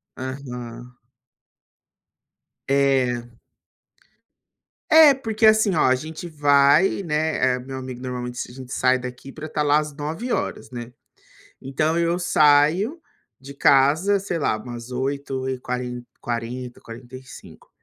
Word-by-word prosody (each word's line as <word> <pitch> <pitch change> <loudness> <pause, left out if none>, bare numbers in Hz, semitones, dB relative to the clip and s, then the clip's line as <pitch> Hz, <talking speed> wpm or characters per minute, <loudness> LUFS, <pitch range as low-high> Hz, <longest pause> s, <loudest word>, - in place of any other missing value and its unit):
Aham. 125 -2 -7 1.7
É. 125 -4 0 1.5
É, 315 -2 +8
porque 225 -4 -1
assim 215 -3 +5
oh - - +1
a 130 -2 +4
gente 155 +5 -7
vai, 145 +4 +3
né. 150 -5 +1
Eh, - - -5
meu 130 +1 -7
amigo 130 -1 -7
normalmente 125 -1 -5
s - - -5
a - - -13
gente 130 -1 -9
sai 130 0 +3
daqui 125 +2 -8
para 155 +3 -8
estar 150 -1 -1
lá 145 0 +4
às 150 -1 -5
21:00hs, 160 - -3
né. 120 -1 -7 0.7
Então 155 +5 -1
eu 170 +1 +1
saio 175 - +3 0.4
de 135 +2 -11
casa, 145 +9 +3
sei 190 -3 -3
lá, 110 - 0
umas 120 +2 -9
oito 135 +1 -3
e 130 -1 -3
quare 125 -1 -4 0.2
quarenta, 120 +1 -5
quarenta 120 +2 -11
e 130 - -14
cinco, 130 - -14
135 Hz, 135 wpm, -23 LUFS, 125-155 Hz, 1.7 s, É